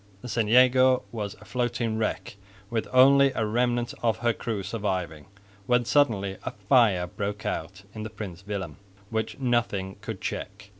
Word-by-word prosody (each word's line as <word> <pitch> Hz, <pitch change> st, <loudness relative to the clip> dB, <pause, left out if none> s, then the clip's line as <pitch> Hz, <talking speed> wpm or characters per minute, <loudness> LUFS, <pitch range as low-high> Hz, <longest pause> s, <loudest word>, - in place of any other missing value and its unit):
the -, -, -6 dB
St 115 Hz, -3 st, -1 dB
Jago 130 Hz, +1 st, +5 dB
was 105 Hz, -2 st, -4 dB
a -, -, -17 dB
floating 120 Hz, -2 st, -1 dB
wreck 110 Hz, -2 st, -2 dB, 0.4 s
with 115 Hz, -2 st, -1 dB
only 135 Hz, +2 st, +6 dB
a 110 Hz, -, 0 dB
remnant 120 Hz, +2 st, 0 dB
of 115 Hz, -2 st, +1 dB
her 120 Hz, -, +4 dB
crew 110 Hz, -3 st, -4 dB
surviving, 95 Hz, -7 st, -3 dB, 0.4 s
when 125 Hz, -1 st, +3 dB
suddenly 110 Hz, -7 st, +2 dB
a -, -, -2 dB, 0.2 s
fire 105 Hz, -9 st, +4 dB
broke 100 Hz, +4 st, -5 dB
out 95 Hz, +4 st, -4 dB
in 110 Hz, -, -7 dB
the 110 Hz, -, -5 dB
Prins 100 Hz, -4 st, -8 dB
Willem, 95 Hz, -7 st, -4 dB, 0.3 s
which 110 Hz, 0 st, -2 dB
nothing 120 Hz, -7 st, -1 dB
could 105 Hz, -2 st, -6 dB
check. 100 Hz, 0 st, -6 dB
110 Hz, 160 wpm, -26 LUFS, 100-120 Hz, 0.4 s, only